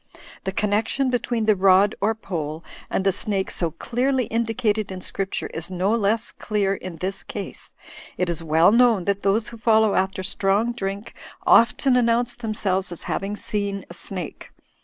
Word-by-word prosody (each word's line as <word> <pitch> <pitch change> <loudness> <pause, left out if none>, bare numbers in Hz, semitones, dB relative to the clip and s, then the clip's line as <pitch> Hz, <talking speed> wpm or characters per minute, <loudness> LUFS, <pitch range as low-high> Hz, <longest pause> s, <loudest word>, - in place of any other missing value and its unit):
Thfc 190 0 -3
connection 215 +6 +1
be 245 - +2
tween 235 -3 -2
the 215 -1 +4
rod 195 +2 +5
or 220 +2 +2
pole 160 -6 -5 0.3
and 190 - -1
the 195 - +4
snake 195 0 -1
so 170 - 0
clearly 255 - -1
indicated 225 -2 -1
in 185 - -5
Scripture 190 +1 -3
is 165 +2 -3
no 185 +2 0
less 225 0 +1
clear 205 -2 -1
in 185 -3 -7
this 190 +3 -3
case. - - -7 0.4
It 180 - 0
is 170 -1 0
well 160 +3 +4
known 230 -5 +4
that 200 0 0
those 205 +3 +1
who 230 - -10
follow 220 -2 +3
after 190 0 0
strong 200 +4 +1
drink 200 -2 -5 0.3
often 250 +3 +5
announce 240 0 +2
themselves 200 -5 -1
as 175 - +1
having 200 +1 -3
seen 200 -2 -3
a - - -7
snake. 175 -1 -7
200 Hz, 170 wpm, -23 LUFS, 190-225 Hz, 0.4 s, rod